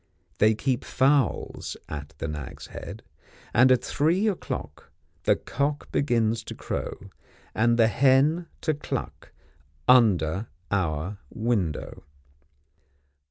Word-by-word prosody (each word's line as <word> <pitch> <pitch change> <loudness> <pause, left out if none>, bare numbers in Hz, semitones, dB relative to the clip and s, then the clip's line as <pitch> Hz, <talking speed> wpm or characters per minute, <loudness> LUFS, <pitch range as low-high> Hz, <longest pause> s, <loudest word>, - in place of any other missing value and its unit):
They 110 +1 +5
keep 130 +2 -1
fowls 135 - +1
at 75 +1 -7
the 80 - -3
Nag's 75 -3 -6
Head; - - -8 0.5
and 130 +2 +6
at 125 -1 +4
three 170 +12 +1
o'clock, 130 - -4 0.4
the - - +5
cock 145 +1 -2
begins 115 -4 +1
to - - -7
crow, - - -5 0.4
and 120 +1 +3
the 115 - +6
hen 140 +8 +3
to 155 - +1
cluck, 150 - -5 0.6
under 105 -6 +4 0.2
our 90 0 -1
window. 110 -9 -2
115 Hz, 110 wpm, -26 LUFS, 95-140 Hz, 0.6 s, and